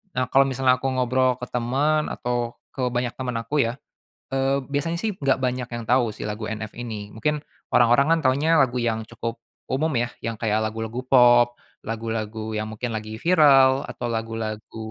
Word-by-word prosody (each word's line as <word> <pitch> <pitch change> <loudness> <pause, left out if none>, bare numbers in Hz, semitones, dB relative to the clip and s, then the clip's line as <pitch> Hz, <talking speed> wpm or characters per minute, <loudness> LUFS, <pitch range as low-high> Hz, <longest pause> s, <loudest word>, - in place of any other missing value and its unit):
Nah, 130 0 +1
kalau 135 0 +6
misalnya 130 0 +2
aku 135 - -3
ngobrol 130 0 +2
ke - - -3
temen 140 +6 +1
atau 120 -1 -2 0.2
ke 135 - -4
banyak 120 0 0
temen 125 -2 -3
aku 115 +7 -5
ya, 115 - -2 0.6
eee, 135 +1 +1
biasanya 150 +4 -1
sih 220 -1 0
enggak 135 -2 +1
banyak 125 -1 -1
yang 120 -1 -4
tahu 125 -1 +4
si - - -11
lagu 105 +1 -4
NF 110 -1 -5
ini, 110 -4 -6
mungkin 150 +6 -1 0.3
orang-orang 140 +7 +5
kan - - -2
taunya 145 +5 +1
lagu 125 -1 +1
yang 110 -1 0
cukup 115 0 -5 0.3
umum 155 +4 +1
ya, 120 0 0
yang 115 -1 -4
kayak 110 -1 0
lagu-lagu 115 +3 -4
pop, 120 -2 +6 0.3
lagu-lagu 110 -1 -4
yang 110 0 -3
mungkin 115 +1 -4
lagi 110 0 -5
viral 140 -6 +5
atau - - -5
lagu-lagu 110 -1 -4
120 Hz, 175 wpm, -24 LUFS, 115-135 Hz, 0.6 s, kalau